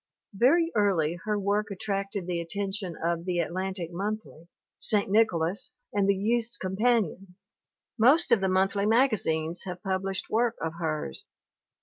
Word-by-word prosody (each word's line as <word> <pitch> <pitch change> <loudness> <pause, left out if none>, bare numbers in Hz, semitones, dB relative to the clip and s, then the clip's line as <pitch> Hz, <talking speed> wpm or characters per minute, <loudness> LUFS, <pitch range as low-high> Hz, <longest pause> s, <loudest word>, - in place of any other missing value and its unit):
Very 330 - +3
early 175 -6 +1
her 210 -1 0
work 205 +1 0
attracted 195 -1 -3
the 175 -1 -2
attention 195 0 -3
of 170 0 0
The 180 -1 -2
Atlantic 180 +1 -3
Monthly, 200 -3 -5 0.3
St. 205 -2 +4
Nicholas, 190 -4 +1 0.2
and 200 -1 +2
the 200 - +4
Youth's 225 +4 -1
Com 185 0 -4
panion. 200 -5 0 0.6
Most 275 +10 +5
of 230 -4 +5
the 190 - +1
monthly 195 +2 +1
magazines 195 -9 +1
have 180 +1 -7
pub 190 -2 -1
lished 195 -1 -4
work 235 +1 +1
of 160 -1 -3
hers. 155 - -3
195 Hz, 145 wpm, -27 LUFS, 175-215 Hz, 0.6 s, Most